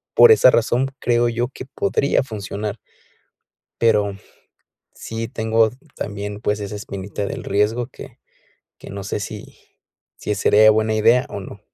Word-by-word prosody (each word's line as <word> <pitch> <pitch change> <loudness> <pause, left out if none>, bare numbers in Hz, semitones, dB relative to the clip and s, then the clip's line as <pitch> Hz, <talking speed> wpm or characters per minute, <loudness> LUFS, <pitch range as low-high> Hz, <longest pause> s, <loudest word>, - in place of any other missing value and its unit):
por 475 - +8
esa 445 - +7
razón, 120 +3 +1
creo 120 0 +2
yo 120 +2 -2
que 130 - -9
podría 140 -2 0
funcionar. 105 -2 -5 1.0
Pero 105 -3 +2 0.8
sí 115 0 -5
tengo 110 0 +2 0.2
también, 105 0 -5
pues, 105 -2 -1
esa 100 0 -5
espinita 100 0 -5
del - - -6
riesgo 105 +4 0
que - - -12 0.6
que - - -12
no 100 0 -6
sé 100 - -3
si 105 +1 -8 0.6
si 105 - -3
sería 110 +3 +5
buena 110 0 +1
idea 115 +4 +4
o 100 - -6
no. - - -10
110 Hz, 145 wpm, -21 LUFS, 105-120 Hz, 1.0 s, por